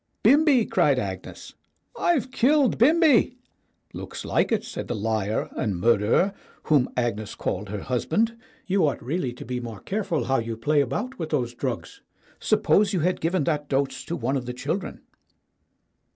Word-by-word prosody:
"Bimbi!" 275 0 +5
cried - - +2
Agnes. - - -6 0.4
"I've 300 - +1
killed 270 -1 +3
Bimbi." 290 -2 +4 0.6
"Looks - - -7
like - - +1
it," 220 -2 +1
said - - -6
the 120 - -2
liar 110 0 -1
and 105 -8 -2
murderer 115 - +3 0.3
whom 145 -5 +3
Agnes 110 -4 -2
called 100 +2 -3
her 105 -1 -4
husband. 220 - 0 0.3
"You 190 -4 +2
ought 135 - -3
really 135 0 -2
to 125 - -10
be 125 +1 -3
more 115 -4 -7
careful 185 - -2
how 135 +1 +1
you 115 -1 -4
play 145 +6 +2
about 165 - -3
with 160 -2 -3
those 125 -6 -1
drugs. - - -5 0.4
Suppose 205 0 +2
you 180 - +1
had 180 +3 0
given 170 0 +1
that 150 -1 -1
dose 135 0 -1
to 170 - -3
one 130 +1 -1
of 125 -3 -3
the 125 - -3
chil 135 +8 -2
dren." 195 - -8
145 Hz, 165 wpm, -25 LUFS, -, 0.6 s, Bimbi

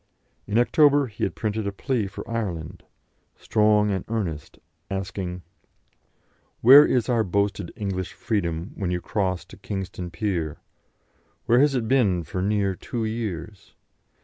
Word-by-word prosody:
In 105 +2 0
October 145 +3 +4
he 110 -4 -7
had - - -1
printed 110 -1 -2
a - - -1
plea 115 +1 -1
for 95 - -8
Ireland, 90 -7 -4 0.5
strong 105 -1 +2
and 95 -2 -1
earnest, 90 -10 -4 0.3
asking: 95 -2 -4 1.2
"Where 135 +5 +10
is 125 -3 +1
our 120 -3 +2
boasted 100 -2 -1
English 95 -3 -3
freedom 85 -5 -2
when 95 -3 -3
you 90 0 -1
cross 95 -2 -2
to - - -14
Kingstown 95 -3 -5
pier? 85 -4 -2 0.9
Where 120 +1 +4
has 140 0 +4
it 115 -3 -1
been 105 -9 +2
for 90 +4 -4
near 100 0 +1
two 115 +5 -4
years? 105 -4 -5
100 Hz, 140 wpm, -24 LUFS, 90-115 Hz, 1.2 s, Where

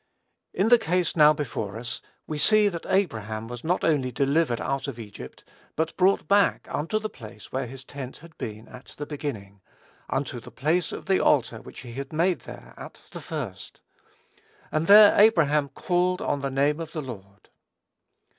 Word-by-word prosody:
In 200 +4 +1
the 240 0 +7
case 180 -4 0
now 150 -2 +7
before 110 -8 -4
us, 115 0 -5 0.2
we 155 -1 -4
see 215 +5 +5
that 170 -3 -7
Abraham 110 - -1
was 120 0 -8
not 180 +3 0
only 140 -5 +1
delivered 140 0 +1
out 135 0 -2
of 135 -4 -5
Egypt, 105 -3 -10 0.3
but 160 +1 -1
brought 190 +2 +2
back 200 -3 +3
"unto 165 +9 -1
the 215 0 -2
place 110 - -12
where 130 -1 -2
his 130 +2 -10
tent 130 -1 -8
had 165 0 -16
been 110 0 -6
at 125 +1 -13
the 145 - -4
beginning,... 110 -10 -6 0.5
unto 135 -2 -2
the - - -12
place 160 +5 0
of - - -7
the 190 -1 +2
altar 120 -6 +2
which - - -11
he 120 -2 -10
had 135 +2 -6
made 170 0 +1
there - - -12
at - - -10
the - - -8
first: - - -6 0.9
and 155 +1 0
there 205 +1 +9
Abraham 150 -9 +4
called 180 +3 0
on 145 - -1
the 140 - -1
name 140 +3 +1
of 165 -1 -6
the 155 - -3
Lord." 100 -6 -11
145 Hz, 180 wpm, -26 LUFS, 120-175 Hz, 0.9 s, there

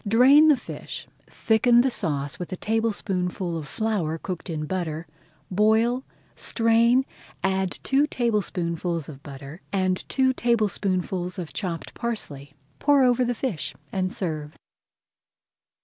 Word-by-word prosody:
Drain 265 +8 +7
the 300 -3 +6
fish, - - -7 0.2
thicken 235 +2 +4
the 260 +1 +1
sauce 145 -8 -1
with 180 - -6
a - - -2
tablespoonful 195 -5 -1
of 155 -3 -5
flour 195 -8 -1
cooked 180 +1 -6
in 155 -2 -3
butter, 165 -2 -3 0.5
boil, 220 +6 +3 0.3
strain, 235 +3 +3 0.4
add 190 -1 0
two 280 +2 +3
tablespoonfuls 175 - -1
of 140 -3 -10
butter, 140 +3 -10
and 185 -2 0
two 260 -1 +3
tablespoonfuls 195 -6 0
of 175 -4 -6
chopped 175 -5 -4
parsley, 145 - -4 0.2
pour 285 -2 +4
over 250 0 +4
the 245 0 0
fish, 220 - -3 0.2
and 185 -1 0
serve. 155 -6 -4
190 Hz, 125 wpm, -25 LUFS, 170-235 Hz, 0.5 s, Drain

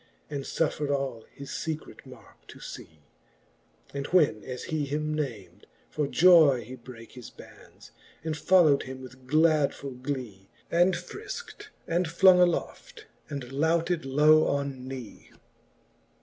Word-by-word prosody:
And 140 -2 -4
futfred 150 -2 -1
all 135 -5 -2
his 140 0 -10
fecret 160 -1 -6
markc - - -16
to - - -13
fee: 80 -2 -11 0.9
And 140 0 -4
when 150 -12 +2
as 125 -1 -6
he 155 -2 -2
him 150 +2 -2
nam'd, 115 - -5 0.2
for 150 -2 -1
joy 160 -6 +6
he 120 +4 -10
brake 120 -2 -13
His 125 -2 -11
bands, - - -16 0.3
and 160 -1 -2
folio 160 -3 +4
wM - - -7
him 130 0 -8
with 130 0 -13
gladfull 145 -4 +1
glee, 125 -9 -6 0.2
And 175 +2 +3
frilkt, 415 - -8 0.2
and 175 +1 0
flong 180 +2 +6
aloft, 430 - -1 0.2
and 140 -4 -6
louted 165 +4 0
low 150 +3 +4
on 140 -2 -3
knee. 130 -4 -9
145 Hz, 135 wpm, -27 LUFS, 130-165 Hz, 0.9 s, joy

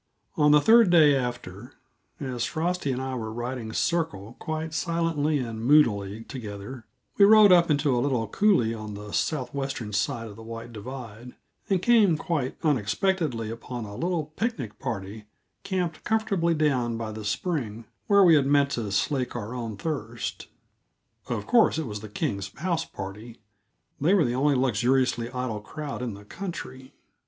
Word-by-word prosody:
On 150 0 +4
the 150 0 +7
third 225 +5 +6
day 155 -5 +6
after, 120 -2 -5 0.5
as 130 -4 -3
Frosty 170 0 -1
and 130 - -2
I 130 0 -3
were 110 -3 -4
riding 120 0 -4
circle 115 - -1
quite 160 0 -4
silently 165 -3 0
and 115 -4 -4
moodily 115 -7 +3
together, 110 0 -8 0.3
we 200 - +9
rode 215 -1 +8
up 175 -2 +6
into 145 -3 +2
a 120 - +1
little 125 -5 0
coulée 120 - +2
on 105 -2 -7
the 105 0 -8
southwestern 135 0 -2
side 115 +3 -1
of 105 0 -11
White 115 +1 -8
Divide, 120 +1 -9 0.3
and 190 -2 +1
came 215 -9 +5
quite 150 -6 -2
unexpectedly 135 - 0
upon 120 0 -6
a 100 - -9
little 160 - -2
picnic 165 - -3
party 105 -3 -5 0.4
camped 180 -5 -2
comfortably 200 -7 +1
down 130 -7 +1
by 115 -1 -4
the 110 0 -7
spring 115 - -3 0.2
where 200 -1 +6
we 175 -3 +7
had 140 -3 +4
meant 140 0 +3
to 110 -6 -3
slake 125 +7 0
our 115 0 -5
own 115 -4 -5
thirst. 120 -5 -4 0.8
Of 110 -4 -3
course, 235 -8 +4
it 160 - -2
was 105 -3 -5
the 110 0 -9
Kings' 100 -1 -3
house 170 0 -1
party; 105 +5 -8 0.6
they 170 +8 +3
were 175 -7 +4
the 120 - 0
only 140 +3 +2
luxuriously 125 0 +1
idle 125 -4 -4
crowd 145 +4 -6
in 120 -5 -4
the 100 +1 -13
country. 130 - -7
130 Hz, 160 wpm, -26 LUFS, 110-160 Hz, 0.8 s, we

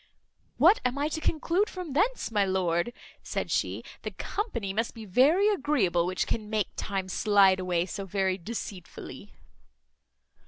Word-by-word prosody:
"What - - +6
am 250 +2 0
I 290 +2 0
to 315 0 -4
conclude 335 +7 +1
from 360 -6 -6
thence, 405 - +1
my 205 -2 +3
lord?" 185 +1 0 0.3
said - - -3
she. - - -1 0.2
"The - - -4
company 235 - -3
must 225 +3 -1
be 225 -1 -8
very 285 - +4
agreeable 210 - +1
which 185 - -1
can 215 -2 -3
make 215 -3 0
time 195 -2 -3
slide 195 -1 +4
away 180 -2 0
so 195 +1 -5
very 190 0 0
deceitfully." 195 -2 -7
210 Hz, 150 wpm, -28 LUFS, 190-290 Hz, 0.3 s, What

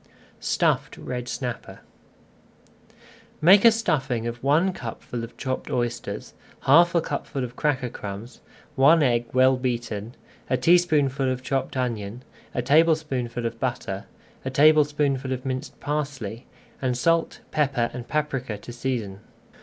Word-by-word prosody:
STUFFED - - 0
RED 125 -1 -5
SNAPPER 125 -3 -5 1.6
Make 190 +5 +7
a 230 - +9
stuffing 135 - 0
of 120 +1 -4
one 160 +7 +3
cupful 120 -2 -6
of 115 - -9
chopped 130 -1 -3
oysters, 120 -1 -3 0.3
half 170 +5 +5
a 170 - +4
cupful 140 -3 -4
of 125 0 -6
cracker 135 -3 0
crumbs, 105 +3 -8 0.3
one 150 +4 +6
egg 120 -3 +2
well 130 +1 +4
beaten, 120 -3 -3 0.3
a 130 - +2
teaspoonful 140 -3 +3
of 130 0 -4
chopped 135 0 -2
onion, 115 -2 -3 0.3
a 125 - 0
tablespoonful 140 -5 +2
of 115 0 -3
butter, 115 -6 -3 0.4
a 130 - -2
tablespoonful 145 -2 +3
of 130 0 -3
minced 130 +2 -4
parsley, 135 -6 -4 0.3
and 125 -2 0
salt, 165 +5 +1
pepper, 135 -6 +1
and 120 -1 -7
paprika 135 -7 -2
to 120 +4 -10
season. 115 -6 -3
130 Hz, 130 wpm, -25 LUFS, 120-150 Hz, 1.6 s, a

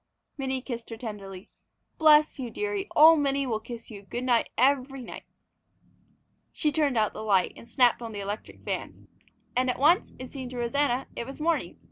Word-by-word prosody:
Minnie 265 -2 -3
kissed 235 -4 -6
her 225 - -7
tenderly. 200 -5 -8 0.5
"Bless 305 -2 +5
you, 250 -2 -4
dearie, 410 - -3
old 320 +1 +8
Minnie 275 -1 +1
will 225 -4 -1
kiss 230 +1 -9
you 205 -2 -9
good 240 +5 -5
night 245 -2 +2
every 270 +1 +2
night!" - - -9 1.3
She 300 - 0
turned 285 -5 +1
out 215 -2 +2
the - - -7
light 195 -4 +2
and 235 - -13
snapped 245 -1 +3
on 230 -1 -6
the 205 - -6
electric 200 +2 -6
fan. - - -5 0.5
And 255 +1 +2
at 250 - -1
once, 320 +8 +3
it 255 - -9
seemed 260 -3 -6
to 250 - -8
Rosanna, 255 +2 0
it 235 - -5
was 270 - -9
morning. 330 +2 -1
255 Hz, 185 wpm, -27 LUFS, 230-285 Hz, 1.3 s, old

